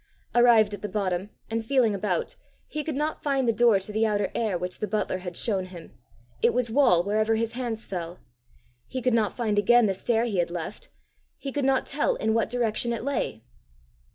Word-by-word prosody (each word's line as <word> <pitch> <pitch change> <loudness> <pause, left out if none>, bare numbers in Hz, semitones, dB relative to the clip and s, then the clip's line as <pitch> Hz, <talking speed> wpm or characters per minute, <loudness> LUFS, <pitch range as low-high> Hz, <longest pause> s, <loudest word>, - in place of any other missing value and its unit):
Arrived 235 -3 +5
at 205 - -6
the 210 - -4
bottom, 190 -2 -2 0.2
and 225 0 -1
feeling 240 -2 +2
about, 195 -3 -2 0.3
he 305 0 -4
could 310 -1 -3
not 300 +2 -2
find 275 -3 0
the 230 - +3
door 235 -2 +5
to 195 +2 -7
the 220 +1 +1
outer 205 -2 +1
air 215 -6 0
which 180 +1 -5
the 210 - -2
butler 210 -2 -1
had 180 -2 -6
shown 195 -5 0
him; 180 -3 -11 0.5
it 470 +1 +3
was 240 -2 0
wall 220 -10 +4
wherever 215 +3 +1
his 230 0 -1
hands 235 -3 -3
felt. 175 -2 -5 0.7
He 260 - -4
could 250 0 +1
not 220 -3 +1
find 215 -4 +1
again 240 +2 +5
the 195 - +1
stair 225 +4 0
he 205 -6 -1
had 175 - +1
left; 175 +3 -6 0.5
he 275 - -5
could 285 0 -1
not 265 -1 +2
tell - - 0
in 220 - 0
what 230 - +1
direction 235 -1 0
it 230 - -4
lay. 270 - -2
220 Hz, 210 wpm, -26 LUFS, 195-245 Hz, 0.7 s, Arrived